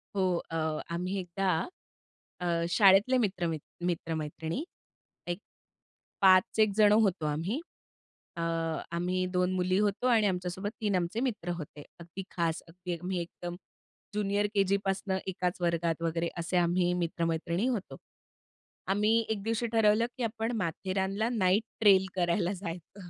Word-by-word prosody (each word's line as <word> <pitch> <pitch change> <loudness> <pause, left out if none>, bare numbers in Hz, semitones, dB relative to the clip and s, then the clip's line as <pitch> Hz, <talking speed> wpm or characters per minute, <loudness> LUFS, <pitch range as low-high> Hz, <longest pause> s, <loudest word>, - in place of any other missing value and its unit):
हो. 185 -2 +2 0.2
अ, 165 - -3 0.4
आम्ही 180 +3 -2
एकदा 180 -1 -1 0.7
अ, 175 - -1 0.2
शाळेतले 195 +8 +5
मित्र 195 -7 0
मित 160 -2 -2 0.3
मित्र-मैत्रिणी 160 - -2 0.6
एक 175 +2 -2 0.8
5 190 +2 +5
एक 215 -1 +5
जण 210 -1 +6
होतो 200 -7 +3
आम्ही, 165 - -1 0.8
अ, 170 - -2 0.6
आम्ही 185 +1 0
2 180 0 +2
मुली 185 +1 +1
होतो 210 +4 +1
आणि 220 -4 +4
आमच्यासोबत 180 +2 -2
3 205 -3 +1
आमचे 180 +5 -1
मित्र 230 -9 -2
होते. 150 -1 -8 0.2
अगदी 170 +3 -8
खास, 165 -2 -1
अगदी 175 0 -5
मी 185 0 -1
एकदम 175 0 -6 0.6
जूनियर 205 0 +1
केजी 200 0 +3
पासनं 195 0 -1
एकाच 180 -1 -2
वर्गात 170 -1 0
वगैरे 165 0 0
असे 170 +2 -1
आम्ही 175 +1 +2
मित्रमैत्रिणी 170 +4 -1
होतो. 230 -7 -3 0.9
आम्ही 210 +4 +3
एक 210 -3 -2
दिवशी 230 +2 0
ठरवलं, 220 0 +4
की 255 - -2
आपण 225 0 -1
माथेरानला 190 +5 -1
नाईट 190 +2 +3 0.2
ट्रेल 195 -3 +6
करायला 175 +1 +1
जायचं. 180 0 -8
185 Hz, 135 wpm, -30 LUFS, 170-205 Hz, 0.9 s, जण